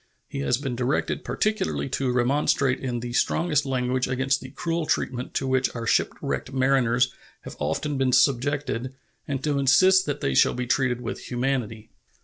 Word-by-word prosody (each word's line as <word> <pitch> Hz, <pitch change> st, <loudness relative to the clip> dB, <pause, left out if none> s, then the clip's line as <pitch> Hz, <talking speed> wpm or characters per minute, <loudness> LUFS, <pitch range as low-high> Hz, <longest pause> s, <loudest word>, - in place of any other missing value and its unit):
He -, -, -6 dB
has 70 Hz, -, +1 dB
been 135 Hz, -2 st, -4 dB
directed 125 Hz, +3 st, -1 dB
particularly 215 Hz, -8 st, -1 dB
to 130 Hz, 0 st, -1 dB
remonstrate 130 Hz, +1 st, +1 dB
in 125 Hz, -3 st, -3 dB
the 120 Hz, 0 st, -5 dB
strongest 150 Hz, +1 st, +1 dB
language 125 Hz, -1 st, 0 dB
against 135 Hz, +1 st, 0 dB
the 130 Hz, -, -9 dB
cruel 165 Hz, +3 st, -3 dB
treatment 125 Hz, -1 st, -2 dB
to 135 Hz, -, 0 dB
which 130 Hz, -1 st, 0 dB
our 115 Hz, -1 st, -4 dB
shipwrecked 130 Hz, -, -1 dB
mariners 125 Hz, -2 st, +2 dB, 0.3 s
have -, -, -9 dB
often 145 Hz, -2 st, -2 dB
been 130 Hz, -1 st, +2 dB
subjected 130 Hz, -1 st, +1 dB, 0.3 s
and 135 Hz, -2 st, -3 dB
to 145 Hz, -2 st, 0 dB
insist 185 Hz, +8 st, +5 dB
that 145 Hz, -, -2 dB
they 70 Hz, -, 0 dB
shall -, -, +4 dB
be 125 Hz, 0 st, -2 dB
treated 125 Hz, -1 st, 0 dB
with 115 Hz, -, -6 dB
humanity. 120 Hz, -4 st, -2 dB
130 Hz, 165 wpm, -25 LUFS, 125-140 Hz, 0.3 s, insist